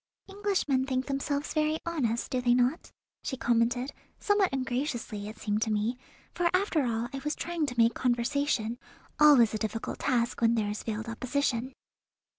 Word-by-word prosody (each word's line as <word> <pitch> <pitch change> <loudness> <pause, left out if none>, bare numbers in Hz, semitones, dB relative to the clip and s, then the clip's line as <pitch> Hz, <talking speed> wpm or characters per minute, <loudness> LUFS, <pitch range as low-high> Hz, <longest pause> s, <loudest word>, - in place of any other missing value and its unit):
"Englishmen 390 -10 0
think 260 -1 0
themselves 280 +1 -2
very 310 0 +1
honest, 255 -9 -1
do 255 - 0
they 245 0 +4
not?" 250 +6 +1 0.3
she 265 - -4
commented, 245 +3 +1 0.3
somewhat 410 -2 +2
ungraciously, 245 -5 -3
it 215 - -10
seemed 210 0 -1
to 225 - +1
me, 215 +3 0 0.4
for 350 -1 +1
after 365 -6 +1
all 230 0 -1
I 270 - -3
was 300 0 -1
trying 340 -3 -2
to 245 -3 -5
make 230 0 +5
conversation, 240 -1 0 0.4
always 275 -8 +7
a 215 - -2
difficult 220 +1 -3
task 240 -4 0
when 230 0 +4
there 210 -2 0
is 210 - -4
veiled 220 0 -4
opposition. 250 +1 -1
250 Hz, 165 wpm, -29 LUFS, 230-290 Hz, 0.4 s, always